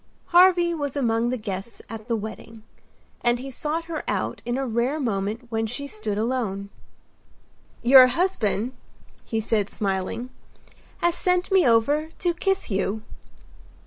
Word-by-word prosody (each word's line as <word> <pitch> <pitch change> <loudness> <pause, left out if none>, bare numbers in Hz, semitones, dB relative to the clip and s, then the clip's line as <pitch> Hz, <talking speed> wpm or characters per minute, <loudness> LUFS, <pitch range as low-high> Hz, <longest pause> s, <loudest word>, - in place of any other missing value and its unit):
Harvy 350 -1 +5
was 285 -4 -3
among 235 -3 +1
the 255 - -1
guests 205 0 -6
at 225 0 -8
the 235 - +1
wedding; 220 +1 -7 0.6
and 240 0 +3
he 270 +2 -7
sought 310 +5 -3
her 330 -2 -4
out - - -2
in 240 +1 -1
a 270 - -1
rare 245 +5 0
moment 220 -1 -2
when 225 0 0
she 245 +6 -4
stood 215 -5 -4
alone. 215 -4 -2 1.1
"Your 255 +1 +9
husband," 250 - 0 0.5
he 225 - -2
said, 215 -2 0
smiling, 195 +5 -3 0.7
"has 345 0 +3
sent 360 +2 0
me 380 -7 +5
over 285 +7 +3
to 350 -1 0
kiss 385 - -1
you." 200 +2 -1
240 Hz, 145 wpm, -24 LUFS, 220-300 Hz, 1.1 s, Your